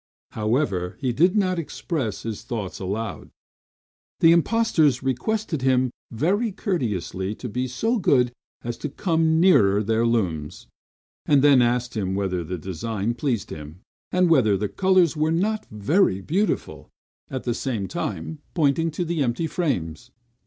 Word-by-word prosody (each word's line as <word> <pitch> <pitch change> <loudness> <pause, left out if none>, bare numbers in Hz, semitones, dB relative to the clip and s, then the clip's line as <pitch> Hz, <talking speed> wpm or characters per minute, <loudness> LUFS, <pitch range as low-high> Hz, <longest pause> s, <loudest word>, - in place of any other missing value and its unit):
However, 105 -5 -1
he 130 -4 -1
did 175 - +3
not 185 -3 +1
express 140 - -4
his 110 -3 -5
thoughts 115 -5 -5
aloud. 105 +4 -4 0.9
The 165 - +6
impostors 165 - +3
requested 155 - -1
him 130 -1 +2 0.2
very 195 - 0
courteously 105 - -2
to 125 - -7
be 125 +4 -2
so 225 - 0
good 125 -9 +3 0.3
as 120 0 -4
to 150 - -4
come 160 0 +1
nearer 105 - +5
their 110 +2 +1
looms; 90 -11 -1 0.6
and 140 -2 +4
then 140 -3 +6
asked 120 0 0
him 95 -3 -1
whether 95 -3 -1
the 90 +3 -4
design 100 +6 -3
pleased 120 - -2
him, 75 +4 -9 0.3
and 180 0 +3
whether 125 -11 +4
the 105 +1 -2
colors 185 -4 +3
were 155 +1 +1
not 210 +6 0
very 105 - +2
beautiful; 185 - -2 0.4
at 130 -1 -4
the 120 - -1
same 115 -6 -3
time 165 -2 -4 0.2
pointing 165 0 +2
to 170 +3 -3
the 165 -2 -1
empty 125 +5 0
frames. 110 - -2
125 Hz, 145 wpm, -24 LUFS, 105-165 Hz, 0.9 s, The